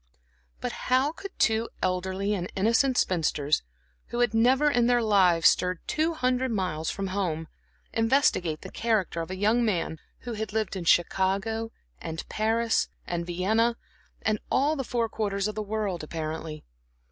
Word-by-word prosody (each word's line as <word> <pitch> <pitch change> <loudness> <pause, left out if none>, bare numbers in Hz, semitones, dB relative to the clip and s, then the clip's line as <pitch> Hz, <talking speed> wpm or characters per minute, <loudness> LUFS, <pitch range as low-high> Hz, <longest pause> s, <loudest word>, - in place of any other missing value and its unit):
But - - -2 0.2
how 260 +3 +3
could 395 +4 -10
two 220 +1 +2
elderly 190 +2 0
and 180 -3 -3
innocent 235 +6 +2
spinsters, 155 -4 +1 0.5
who 240 - -5
had 240 -3 +2
never 255 +6 +4
in 240 -3 +3
their 245 -1 +3
lives 185 -6 +5
stirred 180 0 0
two 320 +2 0
hundred 255 -2 +1
miles 180 -8 -1
from 195 -1 -3
home, 170 -5 -2 0.5
investigate 225 - +2
the - - -9
character 215 -7 0
of 165 - -6
a 185 - -4
young 220 +5 +3
man 175 -7 -1 0.2
who 240 - -5
had 220 -1 -4
lived 220 -3 -1
in 180 -3 -4
Chicago 195 +6 +1 0.3
and 160 0 -6
Paris 225 +1 +1 0.2
and 170 0 -3
Vienna 220 +7 +1 0.5
and 215 -1 +1
all 285 +4 +2
the 270 - -2
four 235 -2 -1
quarters 200 -2 -1
of 215 - -3
the 215 - -3
world 205 -5 -2
apparently? 155 0 -5
210 Hz, 160 wpm, -27 LUFS, 180-235 Hz, 0.5 s, lives